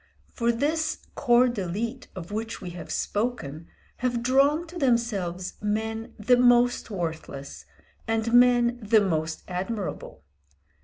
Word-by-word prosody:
For 235 Hz, -1 st, +1 dB
this 310 Hz, +6 st, 0 dB, 0.2 s
corps 245 Hz, -2 st, +4 dB
d'élite 230 Hz, +4 st, -4 dB
of 180 Hz, 0 st, -8 dB
which 225 Hz, +2 st, -4 dB
we 180 Hz, -, -7 dB
have 175 Hz, 0 st, -8 dB
spoken 170 Hz, -, -2 dB, 0.3 s
have 245 Hz, -1 st, -1 dB
drawn 280 Hz, +6 st, +3 dB
to 345 Hz, +1 st, -8 dB
themselves 205 Hz, -9 st, 0 dB
men 220 Hz, +2 st, -2 dB
the 245 Hz, +4 st, +3 dB
most 245 Hz, 0 st, +4 dB
worthless, 160 Hz, -7 st, -5 dB, 0.4 s
and 225 Hz, +1 st, 0 dB
men 245 Hz, 0 st, +5 dB
the 215 Hz, 0 st, +4 dB
most 160 Hz, -4 st, -1 dB
admirable. 185 Hz, -, -5 dB
225 Hz, 120 wpm, -26 LUFS, 185-245 Hz, 0.4 s, men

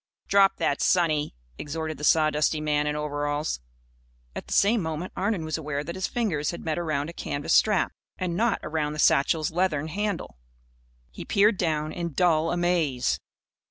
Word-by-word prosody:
"Drop 195 Hz, -1 st, +4 dB
that, 140 Hz, -, 0 dB
sonny!" 155 Hz, -, +2 dB, 0.2 s
exhorted 155 Hz, 0 st, -4 dB
the -, -, -8 dB
sawdusty 155 Hz, 0 st, +3 dB
man 150 Hz, -1 st, 0 dB
in 150 Hz, -, -1 dB
overalls. 145 Hz, -, -2 dB, 0.8 s
At -, -, -6 dB
the -, -, -4 dB
same 210 Hz, +2 st, +4 dB
moment 160 Hz, +2 st, -4 dB
Arnon 195 Hz, -4 st, -1 dB
was 155 Hz, +1 st, -2 dB
aware 145 Hz, -2 st, -3 dB
that 170 Hz, +3 st, -6 dB
his 190 Hz, +1 st, -2 dB
fingers 180 Hz, -12 st, -1 dB
had 170 Hz, -, -6 dB
met 160 Hz, +1 st, -1 dB
around 155 Hz, -2 st, -2 dB
a -, -, -17 dB
canvas 145 Hz, -1 st, -2 dB
strap 210 Hz, -4 st, +3 dB, 0.3 s
and 180 Hz, -2 st, -2 dB
not 225 Hz, +3 st, +1 dB
around 150 Hz, -1 st, -2 dB
the -, -, -7 dB
satchel's 155 Hz, +2 st, +3 dB
leathern 160 Hz, -3 st, 0 dB
handle. 200 Hz, -, -3 dB, 0.7 s
He -, -, -8 dB
peered 205 Hz, 0 st, +3 dB
down, 155 Hz, -3 st, 0 dB
in 170 Hz, -2 st, -4 dB
dull 165 Hz, 0 st, +2 dB
amaze. 175 Hz, -8 st, +1 dB
160 Hz, 165 wpm, -26 LUFS, 150-180 Hz, 0.8 s, Drop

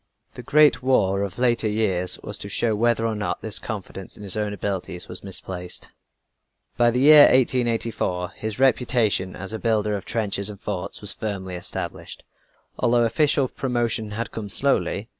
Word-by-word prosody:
The -, -, -9 dB
Great 150 Hz, -3 st, +4 dB
War 100 Hz, -7 st, +2 dB
of 100 Hz, -3 st, -4 dB
later 120 Hz, -2 st, +1 dB
years 95 Hz, -4 st, +2 dB
was 105 Hz, -, +1 dB
to 100 Hz, -, -4 dB
show 110 Hz, +2 st, 0 dB
whether 115 Hz, +1 st, +1 dB
or 115 Hz, -, 0 dB
not 105 Hz, -1 st, -4 dB
this 110 Hz, -1 st, -1 dB
confidence 95 Hz, -3 st, -7 dB
in 105 Hz, -, -11 dB
his 100 Hz, -, +2 dB
own 105 Hz, -1 st, -2 dB
abilities 95 Hz, -2 st, -4 dB
was -, -, -2 dB
misplaced. 90 Hz, -2 st, -5 dB, 0.9 s
By 120 Hz, 0 st, +3 dB
the 125 Hz, +2 st, 0 dB
year 150 Hz, +1 st, +9 dB
1884, 115 Hz, -8 st, +1 dB
his 110 Hz, -1 st, -6 dB
reputation 120 Hz, -7 st, +1 dB
as 95 Hz, +4 st, -6 dB
a 110 Hz, -, -4 dB
builder 105 Hz, -2 st, 0 dB
of 100 Hz, -1 st, -6 dB
trenches 100 Hz, -3 st, -1 dB
and 100 Hz, -2 st, -9 dB
forts 100 Hz, -4 st, -5 dB
was -, -, +3 dB
firmly 95 Hz, -4 st, -5 dB
established, 90 Hz, 0 st, -6 dB, 0.6 s
although 120 Hz, -1 st, +3 dB
official 135 Hz, +3 st, +2 dB
promotion 120 Hz, -4 st, -2 dB
had 115 Hz, +3 st, -5 dB
come 105 Hz, -2 st, -6 dB
slowly. 110 Hz, -2 st, 0 dB
110 Hz, 165 wpm, -23 LUFS, 100-120 Hz, 0.9 s, year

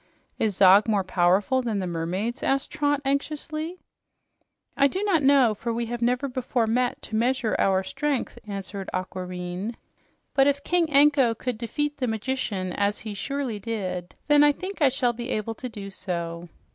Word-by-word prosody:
"Is 215 Hz, -3 st, +1 dB
Zog 195 Hz, +3 st, +6 dB
more 205 Hz, -3 st, +2 dB
powerful 185 Hz, +7 st, +2 dB
than 230 Hz, -4 st, -2 dB
the 190 Hz, -, -1 dB
mermaids?" 180 Hz, +7 st, -3 dB
asked 275 Hz, 0 st, 0 dB
Trot 290 Hz, -1 st, +1 dB
anxiously. 310 Hz, +4 st, -2 dB, 1.0 s
"I 280 Hz, -, +5 dB
do 375 Hz, +8 st, -3 dB
not 380 Hz, -7 st, +2 dB
know, 270 Hz, -5 st, +5 dB
for 235 Hz, +3 st, -4 dB
we 235 Hz, +1 st, -1 dB
have 240 Hz, +1 st, -5 dB
never 250 Hz, +3 st, +1 dB
before 250 Hz, -2 st, -1 dB
met 245 Hz, +2 st, 0 dB
to 220 Hz, -, -5 dB
measure 240 Hz, 0 st, +1 dB
our 190 Hz, -1 st, +3 dB
strength," 290 Hz, +5 st, -2 dB
answered 195 Hz, -1 st, -5 dB
Aquareine. 185 Hz, +3 st, -4 dB, 0.6 s
"But 270 Hz, 0 st, +4 dB
if 285 Hz, 0 st, +1 dB
King 345 Hz, -2 st, +2 dB
Anko 280 Hz, -4 st, +5 dB
could 245 Hz, 0 st, -4 dB
defeat 295 Hz, +5 st, -2 dB
the 255 Hz, -, -1 dB
magician, 220 Hz, -5 st, -2 dB
as 205 Hz, +1 st, 0 dB
he 215 Hz, -2 st, -5 dB
surely 265 Hz, 0 st, -3 dB
did, 185 Hz, -5 st, -4 dB
then 295 Hz, 0 st, +5 dB
I 295 Hz, -, +6 dB
think 370 Hz, +4 st, -7 dB
I 285 Hz, -, +6 dB
shall 250 Hz, -2 st, 0 dB
be 240 Hz, +2 st, -6 dB
able 220 Hz, -1 st, -2 dB
to 250 Hz, +3 st, -7 dB
do 200 Hz, -3 st, -8 dB
so." 170 Hz, -2 st, -4 dB
235 Hz, 170 wpm, -25 LUFS, 195-275 Hz, 1.0 s, Zog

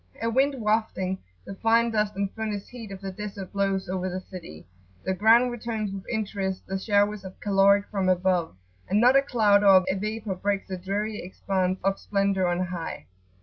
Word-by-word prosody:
A 230 Hz, 0 st, -1 dB
wind 270 Hz, +4 st, +2 dB
wafting 210 Hz, -4 st, 0 dB, 0.3 s
the -, -, -7 dB
fine 230 Hz, +3 st, +2 dB
dust 210 Hz, -2 st, 0 dB
and 200 Hz, 0 st, -2 dB
furnace 215 Hz, -2 st, -4 dB
heat 230 Hz, -4 st, -9 dB
of 195 Hz, 0 st, -8 dB
the 195 Hz, -1 st, -5 dB
desert 200 Hz, -1 st, -7 dB
blows 195 Hz, -1 st, 0 dB
over 185 Hz, 0 st, -2 dB
the 185 Hz, +1 st, -3 dB
city; 180 Hz, -, -10 dB, 0.4 s
the 190 Hz, -, 0 dB
ground 230 Hz, +5 st, +5 dB
returns 220 Hz, -4 st, -3 dB
with 195 Hz, -1 st, -8 dB
interest 200 Hz, -4 st, -3 dB
the 190 Hz, 0 st, -3 dB
showers 205 Hz, 0 st, +1 dB
of 190 Hz, -1 st, -10 dB
caloric 200 Hz, 0 st, +4 dB
from 195 Hz, -3 st, 0 dB
above, 180 Hz, -, +1 dB, 0.3 s
and 200 Hz, -, +3 dB
not 250 Hz, +3 st, +5 dB
a 275 Hz, -, +7 dB
cloud 215 Hz, -7 st, +3 dB
or 190 Hz, -2 st, +7 dB
a 190 Hz, -, +2 dB
vapour 210 Hz, +1 st, -3 dB
breaks 200 Hz, +2 st, -2 dB
the 185 Hz, -, -3 dB
dreary 205 Hz, +4 st, -3 dB
expanse 185 Hz, 0 st, -1 dB
of 195 Hz, 0 st, +1 dB
splendour 195 Hz, -2 st, +1 dB
on 175 Hz, +1 st, 0 dB
high. 170 Hz, -, -6 dB
200 Hz, 190 wpm, -26 LUFS, 190-215 Hz, 0.4 s, a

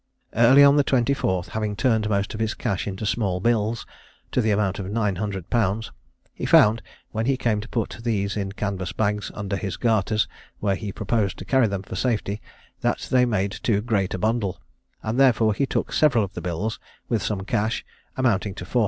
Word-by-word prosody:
Early 125 Hz, +5 st, +7 dB
on 140 Hz, +1 st, +7 dB
the 145 Hz, -, +5 dB
24th, 120 Hz, -9 st, +1 dB
having 105 Hz, -1 st, -2 dB
turned 110 Hz, -3 st, +1 dB
most 100 Hz, -1 st, 0 dB
of 110 Hz, -, -6 dB
his 110 Hz, 0 st, -1 dB
cash 100 Hz, -6 st, -2 dB
into 100 Hz, +1 st, -4 dB
small 100 Hz, -4 st, 0 dB
bills, 115 Hz, +1 st, 0 dB, 0.5 s
to -, -, +2 dB
the 110 Hz, -, +1 dB
amount 100 Hz, -2 st, +1 dB
of 95 Hz, -, -4 dB
900_l._, 105 Hz, +1 st, -1 dB, 0.4 s
he -, -, -5 dB
found, 110 Hz, +2 st, +6 dB, 0.3 s
when 110 Hz, +2 st, -2 dB
he 135 Hz, -1 st, +2 dB
came 110 Hz, -4 st, 0 dB
to 110 Hz, -, -10 dB
put 115 Hz, 0 st, -3 dB
these 100 Hz, -4 st, -1 dB
in 100 Hz, -2 st, -2 dB
canvas 100 Hz, -3 st, -3 dB
bags 105 Hz, -1 st, -1 dB
under 100 Hz, 0 st, -3 dB
his 95 Hz, -2 st, -4 dB
garters, 110 Hz, -2 st, +1 dB, 0.3 s
where 100 Hz, -2 st, +1 dB
he 105 Hz, 0 st, -5 dB
proposed 105 Hz, -1 st, -1 dB
to -, -, -8 dB
carry 130 Hz, -3 st, +3 dB
them 100 Hz, -2 st, -3 dB
for -, -, -7 dB
safety, 105 Hz, -4 st, -1 dB, 0.4 s
that -, -, -1 dB
they 125 Hz, -1 st, +5 dB
made 100 Hz, -4 st, 0 dB
too 110 Hz, -1 st, 0 dB
great 105 Hz, -4 st, 0 dB
a -, -, -3 dB
bundle, 110 Hz, -1 st, 0 dB, 0.4 s
and 110 Hz, +4 st, -1 dB
therefore 115 Hz, -5 st, +4 dB
he 135 Hz, +6 st, 0 dB
took -, -, -2 dB
several 140 Hz, -8 st, +4 dB
of 100 Hz, 0 st, -5 dB
the 90 Hz, -, -6 dB
bills, 90 Hz, +6 st, -3 dB, 0.3 s
with 115 Hz, -4 st, 0 dB
some 100 Hz, -3 st, -2 dB
cash, 105 Hz, +3 st, -1 dB, 0.3 s
amounting 105 Hz, -6 st, +1 dB
to 90 Hz, -, -7 dB
440_l. 125 Hz, -, 0 dB
105 Hz, 195 wpm, -24 LUFS, 100-115 Hz, 0.5 s, Early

